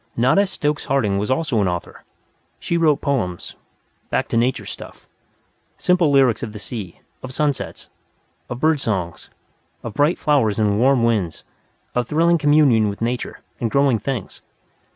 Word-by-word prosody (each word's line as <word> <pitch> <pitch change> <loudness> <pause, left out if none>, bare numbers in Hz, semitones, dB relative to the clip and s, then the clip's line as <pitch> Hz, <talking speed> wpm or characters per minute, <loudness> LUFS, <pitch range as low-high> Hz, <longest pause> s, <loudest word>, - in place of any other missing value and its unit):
Nada 130 +13 +3
Stokes 150 -5 -2
Harding 110 -8 +1
was 105 - -2
also 130 -4 +1
an 100 - +1
author. 90 -2 -5 0.6
She 170 - -2
wrote 160 -4 +3
poems 110 -11 -2 0.5
"back - - 0
to - - -2
nature 120 +3 +1
stuff" - - -10 0.7
simple 180 -3 +2
lyrics 135 -6 +3
of 110 -3 -5
the - - -7
sea, 105 -4 -7 0.2
of 130 - -7
sunsets, 145 0 -2 0.6
of 120 - -5
bird 155 0 +2
songs, 95 -9 -3 0.5
of 115 - -6
bright 145 - +2
flowers 130 -9 +2
and 105 -2 +1
warm 130 0 +3
winds, 105 -8 0 0.5
of 125 -2 -1
thrilling 170 +3 +3
communion 145 -8 +4
with 100 - -6
Nature, 120 +1 -3 0.2
and 115 - -1
growing 140 -2 +2
things. 120 -2 -5
125 Hz, 150 wpm, -21 LUFS, 105-145 Hz, 0.7 s, communion